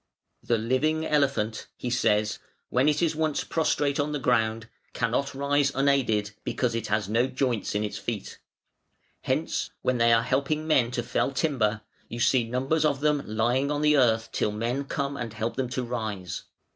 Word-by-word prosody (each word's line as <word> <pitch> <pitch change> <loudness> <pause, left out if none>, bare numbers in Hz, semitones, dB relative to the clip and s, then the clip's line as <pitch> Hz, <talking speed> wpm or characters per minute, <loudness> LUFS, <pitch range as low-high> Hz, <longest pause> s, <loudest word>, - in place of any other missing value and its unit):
"The 120 - +1
living 150 +8 0
elephant" 135 -7 0
he 125 - -4
says, 105 -3 +1 0.3
"when 130 +4 +3
it 150 +3 +1
is 160 -2 +1
once 155 -1 0
prostrate 145 -3 0
on 150 +1 0
the - - 0
ground, 115 -3 +1 0.3
cannot 135 +4 -1
rise 140 0 +2
unaided, 130 -7 +2
because 125 -3 -1
it 115 -1 -2
has 105 -2 0
no 115 +4 +2
joints 125 -6 -1
in 105 - +1
its 105 - -4
feet. 115 -4 -5 0.8
Hence - - -1
when 130 -1 +1
they 115 0 +5
are 115 0 +4
helping 140 +5 0
men 135 -7 +3
to 120 -1 -2
fell 120 - 0
timber, 125 -7 0 0.3
you 120 - -6
see 125 +1 +3
numbers 135 +7 0
of 145 -3 +1
them 150 -1 +2
lying 120 +6 +1
on 145 0 -1
the 150 0 +5
earth 115 -5 +3
till 105 - 0
men 120 +6 -2
come 140 0 -2
and 120 -5 -5
help 110 +1 -3
them 130 -2 -2
to 130 0 -2
rise. 110 -7 -4
125 Hz, 180 wpm, -27 LUFS, 115-140 Hz, 0.8 s, they